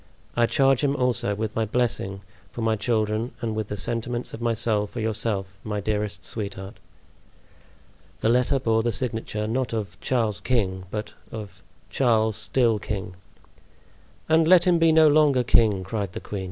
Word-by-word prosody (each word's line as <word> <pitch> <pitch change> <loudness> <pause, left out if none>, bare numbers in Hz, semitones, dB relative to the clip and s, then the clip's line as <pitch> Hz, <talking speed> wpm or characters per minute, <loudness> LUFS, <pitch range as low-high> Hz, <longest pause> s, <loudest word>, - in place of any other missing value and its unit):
I 120 -1 +3
charge 135 0 +3
him 140 0 +2
also 125 -5 0
with 110 +1 -4
my 115 - +1
blessing 105 -4 -1 0.3
for 120 - -6
my 110 -1 +2
children 110 +1 -1
and 115 -3 -3
with 110 -2 -2
the 105 - -5
sentiments 120 +2 -3
of 115 - -7
my 115 -1 +1
soul 110 -2 +1
for 120 - -7
yourself, 105 -3 -2
my 105 -1 -3
dearest 105 -1 -3
sweetheart." 100 -2 -5 1.4
The 110 - +2
letter 125 +3 +3
bore 115 -3 +1
the 120 +1 0
signature, 110 -2 -3
not 120 +3 -1
of 110 -3 -4
"Charles, 115 -6 0
King," 95 -7 0
but 105 +1 -5 0.2
of 100 -4 -8 0.3
"Charles—still 110 -1 +2
king." 100 -3 -5 1.1
"And 160 0 +4
let 180 0 +7
him 175 -2 +4
be 165 -1 +5
no 160 0 +6
longer 145 -4 +4
king," 110 -5 +3
cried 100 -1 -4
the - - -5
queen. 100 - -6
110 Hz, 165 wpm, -25 LUFS, 105-125 Hz, 1.4 s, let